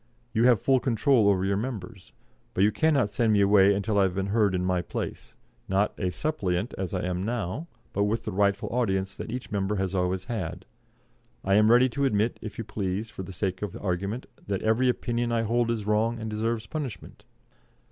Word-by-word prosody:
You 115 +1 +3
have 125 -4 +5
full 135 +4 +3
control 120 -2 +3
over 95 -1 +2
your 100 0 +1
members. 105 -4 -6 0.4
But 95 - +3
you 105 - +4
cannot 140 -6 +2
send 110 +2 +2
me 100 - +4
away 100 0 +6
until 100 +1 0
I - - +5
have 95 -2 +1
been 95 0 -1
heard 105 -4 +3
in 90 0 -1
my 90 -1 +1
place, - - -6 0.3
not 95 +2 +2
a 95 - 0
suppliant 100 - -2
as 95 0 -3
I 90 - -2
am 90 0 -2
now, 115 - -3 0.3
but 100 +1 +1
with 110 +3 -1
the 110 - -2
rightful 100 +1 +1
audience 95 -6 0
that - - -6
each 125 +1 -5
member 100 0 0
has 95 -1 -1
always 90 0 0
had.... 95 -4 -4 0.8
I 95 - +1
am 105 +2 +5
ready 120 +2 +6
to 140 +4 -1
admit, 110 -2 +1
if 110 - -7
you 115 - -3
please, 100 +1 -3
for - - -7
the 95 - -7
sake 95 0 -3
of 105 -4 -4
argument, 100 +6 -2 0.2
that 100 -2 -2
every 110 +4 +3
opinion 120 -1 -1
I 115 -1 +1
hold 120 +1 +1
is 110 -3 -1
wrong 110 +3 +1
and 110 -1 -5
deserves 110 +1 -1
punishment. 125 -5 -6
105 Hz, 210 wpm, -27 LUFS, 95-115 Hz, 0.8 s, away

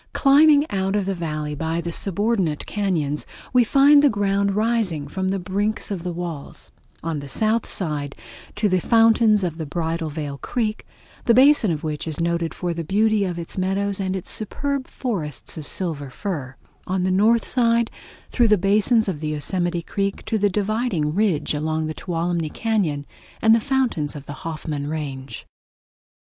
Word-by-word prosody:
Climbing 290 +1 +5
out 195 0 0
of 205 -2 0
the 195 - -1
Valley 155 -4 -3
by 160 +3 -2
the 170 0 -4
subordinate 195 -4 0
cañons, 165 -8 -1 0.3
we 250 -1 +6
find 280 +4 +6
the 290 - +5
ground 200 -2 +1
rising 210 -9 0
from 190 +6 -3
the 195 +1 0
brink 200 +4 -1
of 190 -4 -3
the 180 +1 -3
walls: 170 -4 -6 0.3
on 165 -2 -2
the 140 - -8
south 220 - +1
side 150 -6 -2 0.4
to 210 0 +1
the 185 -2 +2
fountains 225 -1 +4
of 170 -2 -3
the 160 - -3
Bridal 165 +1 -2
Veil 145 -2 -5
Creek, 220 -3 -2 0.4
the 235 - +5
basin 265 -4 +6
of 155 -3 -2
which 155 0 -3
is 155 -1 -3
noted 170 0 0
for 175 -2 -2
the 165 0 -4
beauty 210 +4 +2
of 175 -2 -3
its 170 +2 -5
meadows 195 +1 -1
and 190 -1 -1
its 185 - -4
superb 275 +5 -3
forests 165 - -4
of 155 -3 -7
silver 155 -7 -1
fir; 140 -5 -5 0.3
on 185 0 0
the 185 - +1
north 220 +5 +3
side 235 -2 +2 0.4
through 240 -2 +3
the 210 -1 +5
basin 210 +5 +3
of 180 -6 -2
the 155 - -3
Yosemite 175 +3 -1
Creek 200 +2 -3
to 220 - 0
the 205 0 +3
dividing 205 -5 -1
ridge 185 -7 +1
along 155 +1 -1
the 155 - -3
Tuolumne 170 -1 -2
Cañon 180 -10 -1 0.3
and 220 0 +5
the 230 - +5
fountains 245 - -1
of 145 -1 -8
the 145 - -7
Hoffman 155 -3 -4
Range. 135 -5 -5
185 Hz, 175 wpm, -22 LUFS, 155-215 Hz, 0.4 s, we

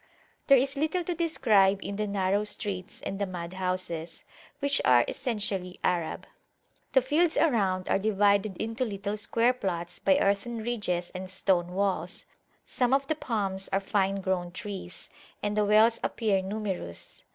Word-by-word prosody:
There 275 - +8
is 270 +2 +1
little 315 +5 0
to 350 - -2
describe 220 - +3
in 200 - -4
the 210 +1 -2
narrow 200 0 +1
streets 200 -3 -5
and 195 - -4
the 200 - 0
mud 175 -1 -6
houses, 180 -3 -3 0.3
which 280 0 +1
are 120 -1 +5
essentially 205 -8 -2
Arab. 170 -3 -1 0.7
The 265 - +5
fields 310 +5 +2
around 195 - +2
are - - +2
divided 200 -1 +2
into 225 +3 -2
little 205 -2 -3
square 230 +3 +2
plots 175 -7 -4
by 190 -1 +3
earthen 200 +4 0
ridges 190 -7 -2
and 185 0 -6
stone 180 -1 +1
walls; 190 -2 -1 0.4
some 250 0 +2
of 275 0 0
the 315 - -1
palms 195 -8 -2
are 195 - +2
fine 195 0 0
grown 185 -2 -1
trees, 190 -1 -7 0.4
and 205 0 -1
the 210 0 +2
wells 220 +3 +5
appear 205 -5 +1
numerous. 190 - -5
200 Hz, 155 wpm, -28 LUFS, 185-230 Hz, 0.7 s, There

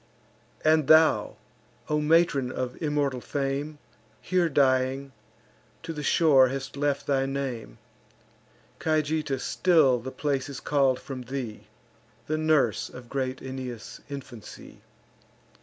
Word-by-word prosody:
And 155 -2 +4
thou, 160 0 +5 0.5
O 150 0 +1
matron 150 -4 +3
of 125 -1 -4
immortal 145 -4 0
fame, 140 +3 -3 0.4
Here 180 -2 +1
dying, 135 -1 +1 0.7
to 165 0 -5
the 150 - -5
shore 145 -3 +5
hast 135 +1 -5
left 145 0 -1
thy 135 -1 +1
name; 130 - -4 1.0
Cajeta 155 -3 0
still 150 -6 +3
the 125 +3 -6
place 140 0 -2
is 140 - -6
call'd 135 -3 +2
from 135 -3 -7
thee, 125 -3 -6 0.6
The 155 +1 -1
nurse 155 -2 +2
of 125 -1 -12
great 130 -1 -3
Aeneas' 130 -3 -7
infancy. 130 -5 -10
140 Hz, 115 wpm, -27 LUFS, 130-150 Hz, 1.0 s, thou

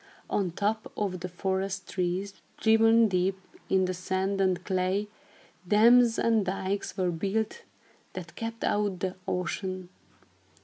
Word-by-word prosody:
On 195 -3 +1
top 210 +5 -2
of 190 -3 -1
the 180 +1 -5
forest 190 +1 -2
trees, 185 +2 -2 0.2
driven 225 +1 +5
deep 190 0 0 0.3
into 190 -1 +3
the 185 - -1
sand 190 +2 -1
and 185 -2 +1
clay, 190 +2 0 0.6
dams 230 +3 +6
and 225 -2 +3
dykes 190 +1 -3
were 180 -2 +1
built, 205 - -2 0.5
that - - -8
kept 230 0 -5
out 205 -3 0
the 185 -1 -2
ocean. 185 0 -3
195 Hz, 130 wpm, -28 LUFS, 185-210 Hz, 0.6 s, dams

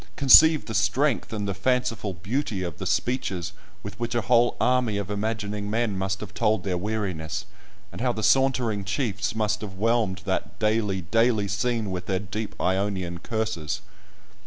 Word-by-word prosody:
conceive 150 +3 +7
the 110 - -6
strength, 115 +6 +1
and 105 -2 -3
the 100 - -1
fanciful 115 0 0
beauty, 105 - -2
of 85 -4 -5
the - - -3
speeches 95 -8 -1 0.3
with 100 +1 -8
which 120 0 -2
a 120 - +2
whole 120 +4 +3
army 125 -5 +2
of 100 0 -4
imagining 105 -1 -2
men 110 -1 0
must 95 +1 -2
have 105 - -7
told 105 -3 +1
their 95 -2 -1
weariness, 95 -5 -3 0.5
and 90 - -7
how 125 0 +2
the 110 -2 -4
sauntering 125 -6 +2
chiefs 105 +1 -2
must 105 -1 0
have 100 -3 -7
whelmed 105 -3 0
that 95 -1 -2
daily, 105 -3 +1
daily 110 +3 +2
scene 110 +1 -1
with 90 -1 -5
their 95 - +1
deep 100 +1 -5
Ionian 95 -2 -1
curses! 110 - -3
105 Hz, 165 wpm, -25 LUFS, 95-115 Hz, 0.5 s, conceive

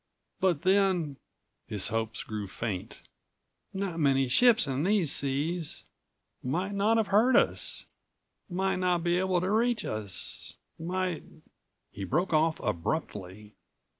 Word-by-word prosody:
But 180 -6 +1
then," 185 -7 +2 0.5
his 105 -2 0
hopes 110 0 -2
grew 105 -2 -5
faint, 105 +1 -5 0.7
"not 190 -4 -3
many 135 -3 +3
ships 235 - +5
in 135 -1 -1
these 190 -5 +2
seas. 145 +4 -1 0.6
Might 180 +10 -2
not 210 +3 +3
have 220 -2 +1
heard 225 +6 +4
us. - - +1 0.6
Might 190 +1 0
not 180 -2 +1
be 175 +1 +2
able 185 -1 +1
to 185 +2 -1
reach 230 0 +1
us. 100 -4 -3 0.2
Might—" 180 0 -2 0.7
He 100 - -7
broke 175 - 0
off 155 +1 +3
abruptly. 105 - -3
165 Hz, 125 wpm, -29 LUFS, 120-190 Hz, 0.7 s, ships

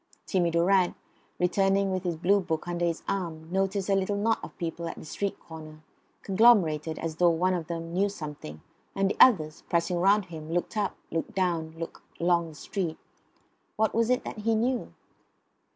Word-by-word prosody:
Timmy 180 -3 +1
Durrant, 175 +2 +3 0.4
returning 195 +2 +2
with 185 0 -2
his 170 -2 -1
Blue 195 +5 +3
book 170 -3 -3
under 175 0 -2
his 165 -1 -2
arm, 165 -5 -3
noticed 195 +1 0
a 200 - +2
little 195 +1 +1
knot 225 +2 +1
of - - -10
people 170 -1 -4
at 165 - -6
the - - -10
street 200 +6 -3
corner; 155 -1 -11 0.4
conglomerated 185 -7 +4
as 160 -1 -4
though 175 0 +5
one 180 +3 +2
of 170 -3 -3
them 165 0 -5
knew 195 +3 +2
something; 150 - -8 0.3
and 195 0 +1
the - - -5
others, 160 -11 +5
pressing 170 +1 +1
round 200 +2 +4
him, 160 -3 -9
looked 175 +4 -1
up, 210 -2 -1 0.2
looked 165 +7 -3
down, 165 -4 -1
looked 165 0 -7 0.2
along 170 -1 +2
the 155 - -13
street. 170 0 -3 0.8
What 220 0 +1
was 230 0 +2
it 250 0 +2
that - - -6
he 225 +1 +1
knew? 245 +3 0
175 Hz, 185 wpm, -28 LUFS, 165-195 Hz, 0.8 s, though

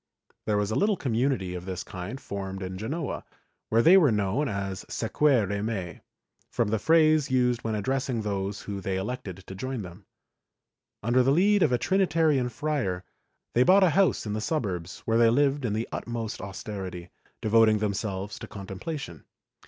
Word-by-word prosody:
There 105 -1 +2
was 105 +1 0
a - - 0
little 205 0 +2
community 120 - 0
of 90 0 -6
this 95 -1 -4
kind 95 +8 -7
formed 95 -3 -5
in 95 0 -5
Genoa, 145 +8 -3 0.5
where 115 +1 +3
they 180 +4 +8
were 155 -9 +5
known 105 +7 0
as 100 -2 -4
Seqvere 110 -5 +1
me, 95 -7 -4 0.5
from 115 -3 0
the 110 0 0
phrase 155 -1 +4
used 125 -2 +2
when 110 -1 -1
addressing 130 +1 -1
those 100 0 -3
whom 100 -1 -5
they 95 0 -2
elected 95 -3 -5
to - - -8
join 125 +3 -4
them. 90 +2 -12 1.0
Under 120 +4 +3
the 125 - +2
lead 195 +7 +4
of 150 - +4
a 125 - +3
Trinitarian 160 -7 +2
friar, 120 -9 -2 0.5
they 120 - +3
bought 190 +9 +6
a 180 - +5
house 195 -5 +2
in 105 - -3
the 110 - -2
suburbs, 95 - -3
where 115 0 +2
they 115 -1 +6
lived 140 +2 +2
in 105 - 0
the 110 +2 -2
utmost 115 -2 -4
austerity, 95 -2 -6 0.3
devoting 110 0 +4
themselves 105 -1 -3
to - - -8
contemplation. 100 - -7
110 Hz, 170 wpm, -27 LUFS, 95-135 Hz, 1.0 s, they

